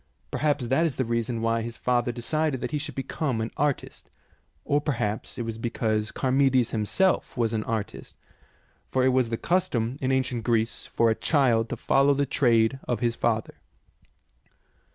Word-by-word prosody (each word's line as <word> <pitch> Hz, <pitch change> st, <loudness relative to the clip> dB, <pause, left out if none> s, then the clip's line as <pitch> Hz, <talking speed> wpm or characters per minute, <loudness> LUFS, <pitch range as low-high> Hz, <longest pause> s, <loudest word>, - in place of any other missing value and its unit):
Perhaps 145 Hz, -4 st, 0 dB
that 135 Hz, +7 st, +2 dB
is 160 Hz, -5 st, 0 dB
the 130 Hz, -, -1 dB
reason 115 Hz, 0 st, -2 dB
why 115 Hz, 0 st, +1 dB
his 115 Hz, 0 st, -6 dB
father 120 Hz, -1 st, +1 dB
decided 140 Hz, +4 st, -1 dB
that -, -, -4 dB
he 150 Hz, -, -1 dB
should 160 Hz, -, -5 dB
become 135 Hz, -2 st, -2 dB
an 110 Hz, +1 st, -3 dB
artist, 145 Hz, -1 st, -2 dB, 0.6 s
or 145 Hz, +1 st, +2 dB
perhaps 110 Hz, -8 st, -2 dB
it 120 Hz, -, -2 dB
was 115 Hz, -1 st, -5 dB
be 120 Hz, -, -2 dB
cause 110 Hz, -2 st, -1 dB
Charmides 130 Hz, -2 st, +3 dB
himself 125 Hz, -, 0 dB
was 115 Hz, -2 st, +1 dB
an 110 Hz, -1 st, -1 dB
artist, 110 Hz, -3 st, -4 dB, 0.7 s
for 130 Hz, -1 st, +1 dB
it -, -, +5 dB
was 130 Hz, -2 st, +2 dB
the 115 Hz, -, -1 dB
custom 130 Hz, -8 st, 0 dB
in 130 Hz, 0 st, +1 dB
ancient 130 Hz, -3 st, 0 dB
Greece 115 Hz, 0 st, 0 dB
for 115 Hz, -1 st, +2 dB
a -, -, +3 dB
child 120 Hz, -7 st, +2 dB
to -, -, -2 dB
follow 140 Hz, +1 st, +3 dB
the 140 Hz, +1 st, +1 dB
trade 120 Hz, -2 st, +2 dB
of 120 Hz, -3 st, 0 dB
his 120 Hz, 0 st, 0 dB
father. 110 Hz, -2 st, -1 dB
120 Hz, 175 wpm, -26 LUFS, 115-135 Hz, 0.7 s, it